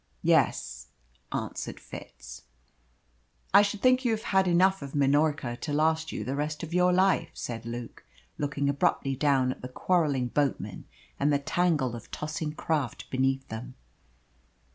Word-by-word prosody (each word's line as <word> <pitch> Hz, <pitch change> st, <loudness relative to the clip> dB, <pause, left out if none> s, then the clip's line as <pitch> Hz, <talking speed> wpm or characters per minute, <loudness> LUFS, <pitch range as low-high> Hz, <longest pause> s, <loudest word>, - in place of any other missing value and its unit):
"Yes," 60 Hz, 0 st, +1 dB, 0.4 s
answered -, -, -4 dB
Fitz. -, -, -11 dB, 1.1 s
"I 200 Hz, -, +9 dB
should 205 Hz, 0 st, -2 dB
think 255 Hz, 0 st, +5 dB
you 245 Hz, -, +2 dB
have 220 Hz, 0 st, -3 dB
had 190 Hz, -1 st, +2 dB
enough 185 Hz, +2 st, +4 dB
of 140 Hz, 0 st, -7 dB
Minorca 145 Hz, -2 st, +2 dB
to 150 Hz, -, -4 dB
last 160 Hz, +1 st, +1 dB
you -, -, -4 dB
the 135 Hz, -, -3 dB
rest 150 Hz, +2 st, -3 dB
of 165 Hz, 0 st, -6 dB
your 180 Hz, 0 st, +4 dB
life," 185 Hz, -2 st, +3 dB
said 115 Hz, -1 st, -5 dB
Luke, 120 Hz, 0 st, -7 dB, 0.4 s
looking 140 Hz, -1 st, -1 dB
abruptly 140 Hz, -1 st, +1 dB
down 135 Hz, -2 st, +2 dB
at -, -, -8 dB
the 125 Hz, -, -5 dB
quarrelling 140 Hz, -4 st, +1 dB
boatmen 145 Hz, +1 st, -1 dB, 0.3 s
and 145 Hz, +2 st, +2 dB
the 145 Hz, -, +4 dB
tangle 145 Hz, -4 st, +1 dB
of 115 Hz, -, -10 dB
tossing 150 Hz, 0 st, -4 dB
craft 150 Hz, -5 st, -2 dB
beneath 135 Hz, 0 st, 0 dB
them. 115 Hz, +3 st, -7 dB
145 Hz, 150 wpm, -28 LUFS, 130-170 Hz, 1.1 s, I